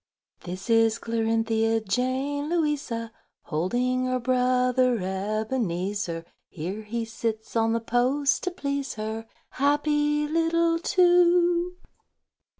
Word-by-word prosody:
_) -, -, -22 dB
THIS 185 Hz, +2 st, -6 dB
is 225 Hz, 0 st, +4 dB
Clarinthia 225 Hz, -1 st, 0 dB
Jane 265 Hz, +6 st, -1 dB
Louisa, 295 Hz, -9 st, -1 dB, 0.3 s
Holding 245 Hz, +11 st, 0 dB
her 255 Hz, 0 st, 0 dB
brother 250 Hz, 0 st, +2 dB
Ebenezer: 195 Hz, -3 st, -2 dB, 0.2 s
Here 185 Hz, +6 st, -5 dB
he 225 Hz, +2 st, -4 dB
sits 225 Hz, 0 st, -4 dB
on 225 Hz, 0 st, +2 dB
the 230 Hz, -, 0 dB
post 255 Hz, +5 st, +1 dB
to -, -, +1 dB
please 280 Hz, -6 st, -3 dB
her,— 220 Hz, +1 st, -5 dB, 0.2 s
Happy 295 Hz, +1 st, +1 dB
little 330 Hz, +1 st, +2 dB
two! 350 Hz, 0 st, +3 dB
250 Hz, 105 wpm, -26 LUFS, 220-290 Hz, 0.3 s, is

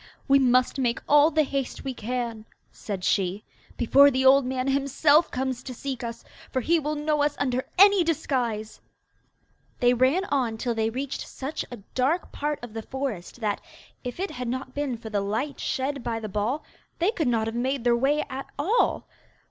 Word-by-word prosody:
'We 275 Hz, 0 st, +6 dB
must 255 Hz, 0 st, +3 dB
make 240 Hz, -2 st, +1 dB
all 295 Hz, +1 st, +6 dB
the 315 Hz, -1 st, +3 dB
haste 275 Hz, -2 st, -3 dB
we 270 Hz, -, -3 dB
can,' 235 Hz, -1 st, -4 dB, 0.3 s
said 195 Hz, -4 st, -6 dB
she, 195 Hz, +2 st, 0 dB, 0.3 s
'before 275 Hz, +4 st, +6 dB
the 265 Hz, -1 st, 0 dB
old 265 Hz, 0 st, +6 dB
man 255 Hz, 0 st, -2 dB
himself 280 Hz, +3 st, +3 dB
comes 260 Hz, -1 st, -2 dB
to 255 Hz, -1 st, -8 dB
seek 265 Hz, 0 st, -5 dB
us, 230 Hz, 0 st, -6 dB, 0.3 s
for 260 Hz, -, -1 dB
he 335 Hz, +7 st, +2 dB
will 305 Hz, 0 st, -2 dB
know 300 Hz, 0 st, 0 dB
us 290 Hz, 0 st, +1 dB
under 260 Hz, -1 st, -1 dB
any 400 Hz, -1 st, +7 dB
disguise.' 250 Hz, -9 st, -2 dB, 1.0 s
They 245 Hz, -1 st, +4 dB
ran 260 Hz, +10 st, +2 dB
on 250 Hz, -, 0 dB
till 240 Hz, +1 st, -1 dB
they 220 Hz, -1 st, 0 dB
reached 265 Hz, +4 st, -4 dB
such 275 Hz, +4 st, -5 dB
a 245 Hz, -, -7 dB, 0.2 s
dark 280 Hz, +8 st, 0 dB
part 295 Hz, 0 st, -2 dB
of 240 Hz, -3 st, -8 dB
the 225 Hz, -, -4 dB
forest 245 Hz, -4 st, -5 dB
that, 210 Hz, -2 st, -1 dB, 0.4 s
if 250 Hz, +4 st, -6 dB
it 385 Hz, +1 st, -2 dB
had 250 Hz, -1 st, -5 dB
not 260 Hz, +2 st, -4 dB
been 285 Hz, -4 st, -2 dB
for 220 Hz, -1 st, -9 dB
the 205 Hz, -1 st, 0 dB
light 220 Hz, +9 st, -2 dB
shed 275 Hz, -1 st, -2 dB
by 225 Hz, -1 st, -2 dB
the 220 Hz, -, -5 dB
ball, 215 Hz, +9 st, -1 dB, 0.3 s
they 355 Hz, +5 st, +2 dB
could 320 Hz, -, -1 dB
not 230 Hz, -2 st, +1 dB
have 225 Hz, +1 st, -4 dB
made 260 Hz, +1 st, -1 dB
their 240 Hz, -1 st, +4 dB
way 280 Hz, +5 st, +1 dB
at 270 Hz, -1 st, -6 dB
all. 390 Hz, +12 st, +1 dB
260 Hz, 190 wpm, -26 LUFS, 235-285 Hz, 1.0 s, any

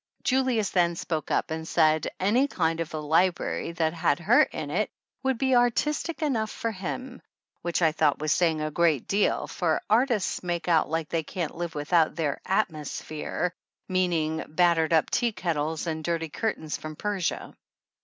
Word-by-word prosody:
Julius 255 Hz, -5 st, +1 dB
then 175 Hz, -2 st, +2 dB
spoke 160 Hz, -2 st, -3 dB
up -, -, 0 dB
and 160 Hz, 0 st, -4 dB
said 155 Hz, -1 st, +3 dB
any 230 Hz, +9 st, +3 dB
kind 165 Hz, -9 st, 0 dB
of 165 Hz, -, -3 dB
a 155 Hz, -, -4 dB
library 170 Hz, +2 st, +1 dB
that 160 Hz, -2 st, 0 dB
had 160 Hz, -3 st, +1 dB
her 170 Hz, -, +5 dB
in 150 Hz, -2 st, -2 dB
it 210 Hz, +7 st, 0 dB, 0.3 s
would 265 Hz, -2 st, 0 dB
be 265 Hz, +1 st, +1 dB
artistic 300 Hz, +7 st, +1 dB
enough 230 Hz, -7 st, 0 dB
for 230 Hz, -, -3 dB
him, 240 Hz, +6 st, -6 dB, 0.4 s
which 175 Hz, 0 st, -1 dB
I 160 Hz, -, +5 dB
thought 155 Hz, -2 st, +2 dB
was 155 Hz, 0 st, -1 dB
saying 160 Hz, -2 st, +2 dB
a 155 Hz, 0 st, -2 dB
great 160 Hz, -4 st, +2 dB
deal, 200 Hz, +1 st, +1 dB
for 165 Hz, -3 st, 0 dB
artists 230 Hz, -3 st, +2 dB
make 175 Hz, -2 st, -3 dB
out 165 Hz, -4 st, +3 dB
like 160 Hz, -1 st, -2 dB
they 165 Hz, -, 0 dB
can't 160 Hz, +1 st, -4 dB
live 170 Hz, -1 st, -5 dB
without 155 Hz, +2 st, +2 dB
their 155 Hz, -4 st, -2 dB
"at 195 Hz, +1 st, +2 dB
mosphere," 155 Hz, +3 st, -4 dB, 0.4 s
meaning 165 Hz, -4 st, 0 dB
battered 165 Hz, 0 st, +2 dB
up 160 Hz, -2 st, +3 dB
tea 235 Hz, -2 st, +1 dB
kettles 160 Hz, -3 st, -2 dB
and 160 Hz, -1 st, -3 dB
dirty 165 Hz, -1 st, -1 dB
curtains 155 Hz, -6 st, -2 dB
from 155 Hz, 0 st, -7 dB
Persia. 200 Hz, -1 st, -2 dB
170 Hz, 175 wpm, -27 LUFS, 155-205 Hz, 0.4 s, her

